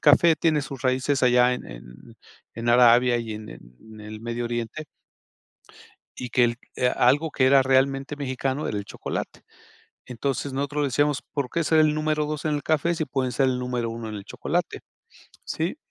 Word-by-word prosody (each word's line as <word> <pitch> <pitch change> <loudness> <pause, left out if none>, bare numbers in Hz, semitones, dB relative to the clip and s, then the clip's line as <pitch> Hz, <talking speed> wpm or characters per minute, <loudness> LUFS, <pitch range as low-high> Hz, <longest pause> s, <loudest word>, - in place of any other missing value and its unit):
café 160 +2 +5
tiene 155 -1 +2
sus 135 -2 -8
raíces 130 +2 +1
allá 125 0 +4
en - - -7
en - - -10 0.7
en 115 +1 -4
Arabia 120 0 +5
y 115 -2 -5
en 105 0 -9
en 105 - -14
el 105 0 -9
Medio 120 +1 -4
Oriente 120 +6 -4 1.3
y 125 - -6
que 125 +1 +4
el 120 0 0 0.2
e 125 - +2
algo 140 +7 +2
que 130 -3 +2
era 135 0 +6
realmente 135 +2 +1
mexicano 135 +1 -2
era 105 - -2
el 100 - -5
chocolate, - - -6 0.7
entonces, 135 +3 -3
nosotros 145 +2 -1
decíamos: 145 +1 +1
"¿Por 140 -3 -2
qué 170 - -1
ser 160 +1 +3
el 155 -1 +4
número 155 0 0
2 150 0 -5
en 155 - +1
el 145 - -4
café, 160 +2 +1
si 160 - -2
pueden 130 -3 -2
ser 135 +3 +2
el 125 -1 0
número 125 -2 -2
1 115 -1 -6
en 110 - -6
el 100 - -7
chocolate?", - - -3 0.7
¿sí?, 165 - -3
130 Hz, 185 wpm, -24 LUFS, 120-145 Hz, 1.3 s, era